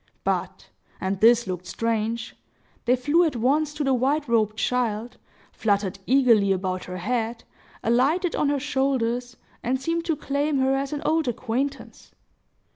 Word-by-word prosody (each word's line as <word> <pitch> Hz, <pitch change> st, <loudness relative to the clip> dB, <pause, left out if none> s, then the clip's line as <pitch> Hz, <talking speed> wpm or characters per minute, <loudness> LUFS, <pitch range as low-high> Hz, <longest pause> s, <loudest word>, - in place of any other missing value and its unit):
But—and 190 Hz, 0 st, -4 dB
this 235 Hz, +2 st, +5 dB
looked 180 Hz, -1 st, -5 dB
strange—they 230 Hz, +2 st, -3 dB
flew 290 Hz, +7 st, +3 dB
at 315 Hz, -6 st, 0 dB
once 280 Hz, +6 st, +1 dB
to 300 Hz, -, -2 dB
the 270 Hz, -1 st, +2 dB
white 275 Hz, +4 st, +1 dB
robed 215 Hz, -2 st, +1 dB
child, 235 Hz, -1 st, -1 dB, 0.3 s
fluttered 200 Hz, -2 st, 0 dB
eagerly 235 Hz, -6 st, +4 dB
about 185 Hz, -1 st, -1 dB
her 180 Hz, 0 st, -6 dB
head, 230 Hz, +4 st, -2 dB, 0.4 s
alighted 290 Hz, +10 st, +2 dB
on 290 Hz, -, +1 dB
her 285 Hz, -1 st, +1 dB
shoulders, 250 Hz, -3 st, -1 dB, 0.2 s
and 255 Hz, +2 st, -1 dB
seemed 330 Hz, +4 st, -2 dB
to 330 Hz, -2 st, +1 dB
claim 285 Hz, +1 st, -1 dB
her 265 Hz, 0 st, +2 dB
as 275 Hz, 0 st, -1 dB
an 295 Hz, -1 st, -4 dB
old 320 Hz, -2 st, +1 dB
acquaintance. 245 Hz, +3 st, -3 dB
245 Hz, 140 wpm, -25 LUFS, 220-280 Hz, 0.4 s, this